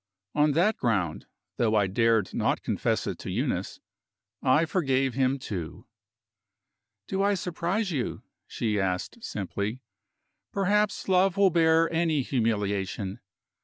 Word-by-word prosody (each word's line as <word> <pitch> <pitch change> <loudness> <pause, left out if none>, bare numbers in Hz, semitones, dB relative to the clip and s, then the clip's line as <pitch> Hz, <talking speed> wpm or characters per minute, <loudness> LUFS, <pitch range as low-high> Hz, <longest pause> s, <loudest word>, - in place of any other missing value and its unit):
On 150 0 +3
that 185 +8 +2
ground 100 - -1 0.3
though 110 -2 +2
I 105 -2 +4
dared 110 +1 +2
not - - 0
confess - - 0
it - - -4
to - - -6
Eunice - - -2 0.6
I 140 +5 +4
forgave 135 -7 +1
him, 135 +1 +1
too. 100 -3 -6 1.2
"Do 190 - -1
I 200 +1 +3
surprise 180 +3 -2
you?" 135 -7 -3 0.2
she 105 -3 -1
asked 95 - -2
simply. 105 +4 -4 0.7
"Perhaps 205 +1 +1
love 190 0 +3
will 195 -2 +5
bear 165 0 +4
any 160 -4 +1
humiliation. 100 -5 -1
135 Hz, 125 wpm, -27 LUFS, 105-175 Hz, 1.2 s, will